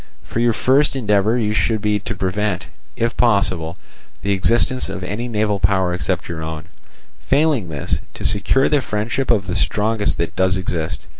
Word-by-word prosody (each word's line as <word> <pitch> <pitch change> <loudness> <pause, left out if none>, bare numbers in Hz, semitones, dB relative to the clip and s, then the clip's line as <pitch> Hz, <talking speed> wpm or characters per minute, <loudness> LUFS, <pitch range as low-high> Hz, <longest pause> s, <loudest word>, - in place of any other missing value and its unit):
For - - -4
your 120 0 +3
first 135 +6 +3
endeavour 105 -1 +1
should 110 0 +1
be 105 0 0
to - - -5
prevent, 95 -1 -2 0.3
if 115 +2 -1
possible, 90 -7 +1 0.5
the 100 - 0
existence 115 +5 +2
of 95 -1 -5
any 105 +7 -3
naval 105 -3 0
power 95 -1 +2
except 90 0 -2
your 85 -1 -5
own; 80 -1 -5 0.6
failing 140 - +2
this, 75 -3 -2 0.2
to - - -7
secure 130 +6 +3
the 150 -2 +2
friendship 115 +4 -2
of 105 -4 +3
the 90 - -3
strongest 105 0 0
that 85 - -3
does 95 0 +2
exist. 85 -2 -3
105 Hz, 165 wpm, -20 LUFS, 95-115 Hz, 0.6 s, your